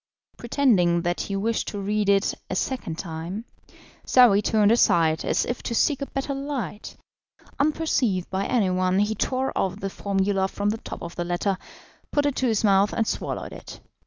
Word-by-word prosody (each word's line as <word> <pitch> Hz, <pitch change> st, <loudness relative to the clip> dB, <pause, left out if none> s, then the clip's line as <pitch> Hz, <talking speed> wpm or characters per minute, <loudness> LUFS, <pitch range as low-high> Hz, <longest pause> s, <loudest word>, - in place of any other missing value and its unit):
Pretending 200 Hz, -10 st, +2 dB
that 175 Hz, 0 st, -1 dB
he 195 Hz, -, -4 dB
wished 220 Hz, +3 st, -1 dB
to 205 Hz, -, -4 dB
read 205 Hz, +1 st, 0 dB
it 200 Hz, 0 st, +3 dB, 0.2 s
a -, -, -2 dB
second 185 Hz, -7 st, -3 dB
time, 170 Hz, +6 st, -5 dB, 0.6 s
Saouy 235 Hz, -6 st, +5 dB
turned 210 Hz, 0 st, +3 dB
aside 165 Hz, -8 st, +3 dB
as -, -, +1 dB
if 245 Hz, -, -4 dB
to 235 Hz, -, -3 dB
seek 285 Hz, +3 st, +2 dB
a 275 Hz, -, -2 dB
better 275 Hz, +1 st, -3 dB
light; 270 Hz, -, -5 dB, 0.6 s
unperceived 280 Hz, -, +1 dB
by 195 Hz, +1 st, -1 dB
anyone 185 Hz, -5 st, +1 dB
he 210 Hz, +2 st, +2 dB
tore 260 Hz, +4 st, -1 dB
off 190 Hz, +1 st, -1 dB
the 195 Hz, -1 st, -4 dB
formula 195 Hz, -1 st, 0 dB
from 205 Hz, +1 st, -2 dB
the 220 Hz, -, -4 dB
top -, -, -8 dB
of 170 Hz, 0 st, -7 dB
the 175 Hz, -, -1 dB
letter, 175 Hz, +3 st, -1 dB, 0.6 s
put 290 Hz, -1 st, +1 dB
it 285 Hz, -2 st, 0 dB
to 260 Hz, -, +1 dB
his 220 Hz, -2 st, +1 dB
mouth, 200 Hz, -1 st, +4 dB
and 225 Hz, -, +1 dB
swallowed -, -, -3 dB
it. -, -, -10 dB
205 Hz, 180 wpm, -24 LUFS, 185-245 Hz, 0.6 s, Saouy